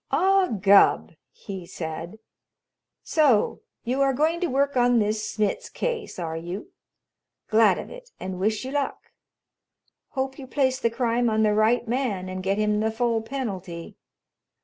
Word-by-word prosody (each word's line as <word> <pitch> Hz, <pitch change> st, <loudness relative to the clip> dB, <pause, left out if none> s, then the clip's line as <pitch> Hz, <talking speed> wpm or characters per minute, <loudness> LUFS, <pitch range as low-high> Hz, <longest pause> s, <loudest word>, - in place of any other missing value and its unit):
"Ah, 385 Hz, 0 st, +3 dB
Gubb!" 200 Hz, -, +4 dB, 0.2 s
he 190 Hz, +1 st, -8 dB
said. 165 Hz, +4 st, -6 dB, 0.9 s
"So 285 Hz, -10 st, +2 dB, 0.2 s
you 255 Hz, +3 st, -1 dB
are 275 Hz, -1 st, +3 dB
going 315 Hz, +5 st, +1 dB
to 355 Hz, -, 0 dB
work 280 Hz, 0 st, +1 dB
on 245 Hz, -1 st, +4 dB
this 215 Hz, 0 st, 0 dB
Smitz 215 Hz, -, -2 dB
case, 465 Hz, -4 st, -3 dB
are 165 Hz, -3 st, -4 dB
you? 175 Hz, -, -6 dB, 0.8 s
Glad 215 Hz, -4 st, +5 dB
of -, -, -7 dB
it, -, -, -11 dB
and 185 Hz, -1 st, -5 dB
wish 215 Hz, +5 st, 0 dB
you 260 Hz, -, -5 dB
luck. 285 Hz, -1 st, -3 dB, 1.0 s
Hope 265 Hz, 0 st, -3 dB
you 265 Hz, -, -8 dB
place 260 Hz, -1 st, +1 dB
the 230 Hz, -, +1 dB
crime 235 Hz, 0 st, +1 dB
on 220 Hz, 0 st, +2 dB
the 210 Hz, -1 st, +3 dB
right 220 Hz, +3 st, +2 dB
man 225 Hz, -7 st, -1 dB
and 185 Hz, 0 st, -5 dB
get 195 Hz, +2 st, 0 dB
him 210 Hz, 0 st, +1 dB
the 220 Hz, +1 st, +1 dB
full 230 Hz, 0 st, 0 dB
penalty. 195 Hz, -9 st, -5 dB
225 Hz, 155 wpm, -25 LUFS, 200-270 Hz, 1.0 s, Glad